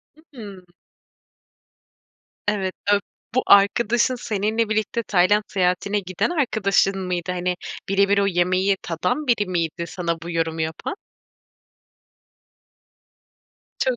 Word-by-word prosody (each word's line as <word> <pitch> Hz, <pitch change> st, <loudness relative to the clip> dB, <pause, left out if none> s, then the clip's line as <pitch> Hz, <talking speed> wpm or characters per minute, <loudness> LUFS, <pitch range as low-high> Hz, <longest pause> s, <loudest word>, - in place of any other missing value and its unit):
Hı 310 Hz, -, -20 dB, 0.2 s
hı. 195 Hz, -5 st, -10 dB, 1.8 s
Evet, 195 Hz, -3 st, 0 dB, 0.2 s
ö -, -, +3 dB, 0.4 s
bu 255 Hz, -, +3 dB
arkadaşın 230 Hz, +5 st, +4 dB
seninle 220 Hz, -1 st, -1 dB
birlikte 220 Hz, +2 st, -1 dB
Tayland 205 Hz, +1 st, +3 dB
seyahatine 190 Hz, +2 st, 0 dB
giden 185 Hz, -, -2 dB
arkadaşın 200 Hz, -, +1 dB
mıydı? 180 Hz, 0 st, -2 dB
Hani, 180 Hz, 0 st, -1 dB, 0.3 s
birebir 200 Hz, +1 st, +3 dB
o 200 Hz, -, +3 dB
yemeği 185 Hz, +1 st, +2 dB
tadan 180 Hz, -, -2 dB
biri 230 Hz, -5 st, +2 dB
miydi 170 Hz, -2 st, -2 dB
sana 170 Hz, -1 st, -3 dB
bu 170 Hz, -, -6 dB
yorumu 165 Hz, -1 st, -1 dB
yapan? 160 Hz, -, -3 dB, 2.8 s
Çok. 260 Hz, -2 st, +1 dB
195 Hz, 105 wpm, -22 LUFS, 180-210 Hz, 2.8 s, arkadaşın